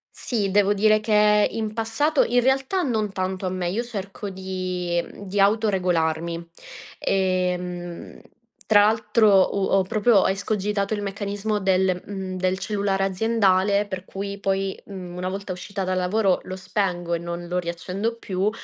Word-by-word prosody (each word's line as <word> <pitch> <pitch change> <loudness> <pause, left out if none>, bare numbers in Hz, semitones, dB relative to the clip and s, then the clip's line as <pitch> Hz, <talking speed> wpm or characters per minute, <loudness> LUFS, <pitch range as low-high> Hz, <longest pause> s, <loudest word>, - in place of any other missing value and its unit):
Sì, 210 -6 -1
devo 205 +1 +3
dire 215 +1 +4
che 210 -1 +4
in 220 -1 -3
passato 235 +7 +1
in 245 +1 +2
realtà 270 +8 +1
non 220 - -1
tanto 185 0 -3
a - - +1
me, 180 -1 -2
io 235 +5 -1
cerco 205 -3 -6
di, 185 -2 -2
mhmm 200 - -11
di 200 +2 -2
autoregolarmi. 175 -5 +1 0.5
Ehm, 180 -2 -2 0.5
tra 205 -2 +6
l'altro, 215 -3 +3
uhm, 195 - +1
ho 190 - +4
proprio 210 +1 +3
escogitato 200 +1 -1
il 205 - -3
meccanismo 205 +1 -2
del, 185 -1 +2
mhmm 190 -2 -5
del 185 0 0
cellulare 200 -1 0
aziendale 200 0 +2
per 190 -2 -6
cui 200 +1 -5
poi, 195 -1 -1
mhmm, 185 -3 -8
una 180 +1 -3
volta 195 0 -4
uscita 195 +2 -5
dal 185 0 -1
lavoro, 190 +1 +2
lo 185 - -6
spengo 180 -4 -2
e 170 - 0
non 170 0 -5
lo 180 +1 -1
riaccendo 180 +6 -3
più; 195 -2 -1
195 Hz, 155 wpm, -24 LUFS, 185-210 Hz, 0.5 s, tra